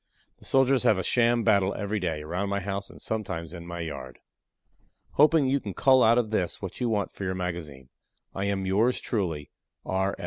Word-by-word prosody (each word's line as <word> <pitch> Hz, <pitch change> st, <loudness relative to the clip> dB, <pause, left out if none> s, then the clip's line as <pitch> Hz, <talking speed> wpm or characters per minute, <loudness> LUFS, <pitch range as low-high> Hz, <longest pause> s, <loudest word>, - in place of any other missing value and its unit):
The -, -, -16 dB
soldiers 135 Hz, -1 st, +3 dB
have 105 Hz, -, +4 dB
a 95 Hz, -, -1 dB
sham 120 Hz, -1 st, +3 dB
battle 100 Hz, -3 st, +3 dB
every 105 Hz, +1 st, -2 dB
day, 80 Hz, -5 st, -2 dB
around 90 Hz, +6 st, -2 dB
my 100 Hz, 0 st, 0 dB
house 100 Hz, +1 st, -4 dB
and -, -, -13 dB
sometimes 85 Hz, -7 st, -4 dB
in 85 Hz, -1 st, -9 dB
my 85 Hz, 0 st, -5 dB
yard. 70 Hz, -5 st, -6 dB, 0.9 s
Hoping 150 Hz, 0 st, +4 dB
you 135 Hz, +2 st, +2 dB
can 100 Hz, -7 st, -7 dB
cull 130 Hz, -1 st, +5 dB
out 115 Hz, +1 st, +5 dB
of 115 Hz, -3 st, 0 dB
this 90 Hz, -6 st, -1 dB
what 95 Hz, +5 st, -7 dB
you 120 Hz, -, +1 dB
want 105 Hz, -2 st, -1 dB
for -, -, -8 dB
your 95 Hz, -1 st, -2 dB
magazine, 85 Hz, -8 st, -5 dB, 0.4 s
I 95 Hz, -, -2 dB
am 100 Hz, -1 st, -1 dB
Yours 110 Hz, +7 st, +2 dB
truly, 80 Hz, -, -3 dB, 0.3 s
R. 95 Hz, +1 st, -1 dB
100 Hz, 200 wpm, -27 LUFS, 85-115 Hz, 0.9 s, cull